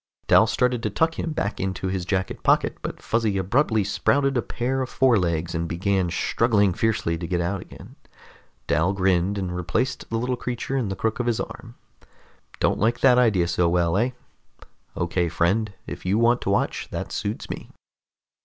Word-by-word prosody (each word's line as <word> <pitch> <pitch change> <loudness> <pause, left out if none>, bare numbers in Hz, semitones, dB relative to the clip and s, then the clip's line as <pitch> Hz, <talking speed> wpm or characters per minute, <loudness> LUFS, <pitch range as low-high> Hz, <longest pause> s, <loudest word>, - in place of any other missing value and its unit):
Dal 110 - +5
started 125 +1 +1
to 110 - -1
tuck 160 +10 0
him 165 - -2
back 110 -8 -2
into 95 0 -3
his 95 -1 -2
jacket 95 0 -2
pocket, - - +2
but - - -6
Fuzzy 110 -3 0
abruptly 110 +3 +2
sprouted 135 +7 +1
a 120 - +2
pair 130 +3 -2
of 130 - -3
forelegs 85 -10 +1
and 85 0 -2
began 95 +1 0
struggling 105 +1 +2
fiercely 85 -6 0
to 85 - -4
get 90 0 -1
out 90 +2 -1
again. - - -13 0.7
Dal 80 +6 +1
grinned 95 0 +1
and 90 -2 -3
replaced 90 +9 -2
the 115 - -1
little 125 +2 -1
creature 125 +2 -4
in 125 -7 0
the 95 - -3
crook 110 +3 -2
of 120 - -1
his 115 -2 +1
arm. - - -7 0.8
"Don't - - +1
like 115 +2 +1
that 125 -2 +6
idea 100 -8 +3
so 85 0 +1
well, 85 0 +1
eh? 115 +5 +2 0.9
Okay, 85 0 0
friend. 95 +6 +1
If - - -7
you 95 +3 +1
want 120 +1 +3
to - - -2
watch, 100 - 0
that - - -5
suits 105 +1 -3
me." - - -7
100 Hz, 180 wpm, -24 LUFS, 90-120 Hz, 0.9 s, that